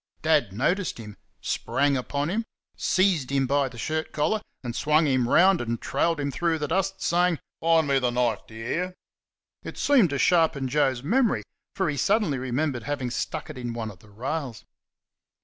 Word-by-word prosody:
Dad 150 Hz, -9 st, +3 dB
noticed 175 Hz, -, 0 dB
him; 105 Hz, -3 st, -9 dB, 0.3 s
sprang 140 Hz, 0 st, 0 dB
upon 140 Hz, +4 st, -2 dB
him; 225 Hz, +4 st, 0 dB, 0.3 s
seized 185 Hz, -8 st, +1 dB
him 135 Hz, -1 st, +2 dB
by 140 Hz, +1 st, +1 dB
the 120 Hz, -, -13 dB
shirt 155 Hz, +7 st, -2 dB
collar 200 Hz, +8 st, 0 dB, 0.2 s
and 120 Hz, -2 st, -4 dB
swung 155 Hz, +2 st, +3 dB
him 130 Hz, -4 st, +1 dB
round 185 Hz, +4 st, +5 dB
and 115 Hz, -1 st, -2 dB
trailed 165 Hz, -2 st, 0 dB
him 140 Hz, -1 st, -1 dB
through 165 Hz, +5 st, 0 dB
the 150 Hz, -1 st, -3 dB
yard, 185 Hz, +4 st, +1 dB
saying: 175 Hz, -2 st, +2 dB, 0.2 s
"Find 165 Hz, -2 st, +3 dB
me 140 Hz, -1 st, +3 dB
th' 125 Hz, -2 st, 0 dB
knife; 120 Hz, -3 st, 0 dB
d' -, -, -15 dB
y' -, -, -9 dB
HEAR?" 180 Hz, +7 st, -2 dB, 0.7 s
It -, -, -8 dB
seemed 255 Hz, -, +4 dB
to 140 Hz, -, -2 dB
sharpen 160 Hz, -3 st, +3 dB
Joe's 130 Hz, -2 st, +1 dB
memory, 235 Hz, -, +2 dB, 0.3 s
for 190 Hz, -2 st, 0 dB
he 150 Hz, -2 st, -2 dB
suddenly 150 Hz, -, +1 dB
remembered 130 Hz, +1 st, -1 dB
having 130 Hz, +1 st, -3 dB
stuck -, -, -4 dB
it -, -, -9 dB
in 120 Hz, -1 st, -4 dB
one 115 Hz, -2 st, -4 dB
of 95 Hz, -, -16 dB
the 105 Hz, -, -19 dB
rails. 125 Hz, +2 st, -5 dB
145 Hz, 185 wpm, -26 LUFS, 125-165 Hz, 0.7 s, round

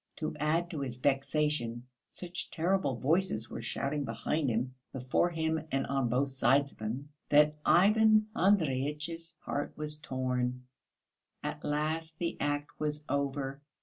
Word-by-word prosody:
To -, -, -3 dB
add 165 Hz, +4 st, +1 dB
to 160 Hz, -, -4 dB
his 130 Hz, -3 st, -4 dB
vexation, 135 Hz, -3 st, 0 dB, 0.2 s
such 180 Hz, 0 st, -6 dB
terrible 175 Hz, -4 st, +1 dB
voices 140 Hz, -, +1 dB
were -, -, -5 dB
shouting 140 Hz, +7 st, -2 dB
behind 150 Hz, +1 st, -1 dB
him, 120 Hz, +3 st, -1 dB, 0.2 s
before 130 Hz, +6 st, +1 dB
him 160 Hz, -1 st, -1 dB
and 135 Hz, -, +1 dB
on 135 Hz, -3 st, 0 dB
both 135 Hz, +3 st, +1 dB
sides 135 Hz, +2 st, +3 dB
of -, -, -22 dB
him, 120 Hz, +7 st, -4 dB, 0.2 s
that 150 Hz, +1 st, +5 dB
Ivan 215 Hz, +3 st, +6 dB
Andreyitch's 165 Hz, -, +1 dB
heart 145 Hz, -, -3 dB
was 150 Hz, 0 st, -1 dB
torn. 125 Hz, -2 st, -2 dB, 0.8 s
At -, -, -4 dB
last 155 Hz, +2 st, -1 dB
the 170 Hz, 0 st, -2 dB
act 145 Hz, 0 st, -2 dB
was 150 Hz, 0 st, -2 dB
over. 140 Hz, 0 st, -1 dB
145 Hz, 140 wpm, -31 LUFS, 130-160 Hz, 0.8 s, Ivan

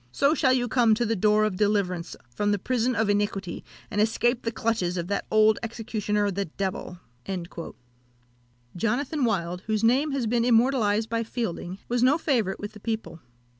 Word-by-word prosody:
So 280 Hz, -, +3 dB
shall 265 Hz, -4 st, +3 dB
you 245 Hz, -1 st, +1 dB
come 230 Hz, -2 st, +4 dB
to 240 Hz, +2 st, 0 dB
the 225 Hz, +1 st, 0 dB
door 210 Hz, +2 st, +3 dB
of 210 Hz, -4 st, 0 dB
deliverance 190 Hz, -5 st, 0 dB
from 205 Hz, +13 st, -1 dB
the 205 Hz, -, +2 dB
prison 245 Hz, +4 st, 0 dB
of 220 Hz, -1 st, +1 dB
iniquity, 205 Hz, -2 st, -1 dB, 0.3 s
and 210 Hz, -, +1 dB
escape 235 Hz, +3 st, +1 dB
the 230 Hz, -, -2 dB
clutches 220 Hz, -6 st, -1 dB
of 175 Hz, +1 st, -3 dB
that 200 Hz, -, -2 dB
old 215 Hz, 0 st, +4 dB
executioner 215 Hz, -3 st, -1 dB
the 200 Hz, +1 st, -2 dB
devil!" 185 Hz, +1 st, -4 dB, 1.8 s
Jonathan 255 Hz, -, 0 dB
Wild, 180 Hz, -5 st, -1 dB
whose 215 Hz, 0 st, 0 dB
name 265 Hz, +6 st, +3 dB
has 270 Hz, -4 st, -1 dB
been 230 Hz, +1 st, +1 dB
immortalised 230 Hz, -3 st, +3 dB
by 230 Hz, 0 st, -1 dB
Fielding, 220 Hz, -6 st, -4 dB
was 240 Hz, 0 st, 0 dB
no 260 Hz, +5 st, +5 dB
favourite 235 Hz, -, 0 dB
with 205 Hz, +1 st, -6 dB
the 210 Hz, -, -12 dB
people. 220 Hz, -5 st, -4 dB
220 Hz, 170 wpm, -26 LUFS, 200-240 Hz, 1.8 s, no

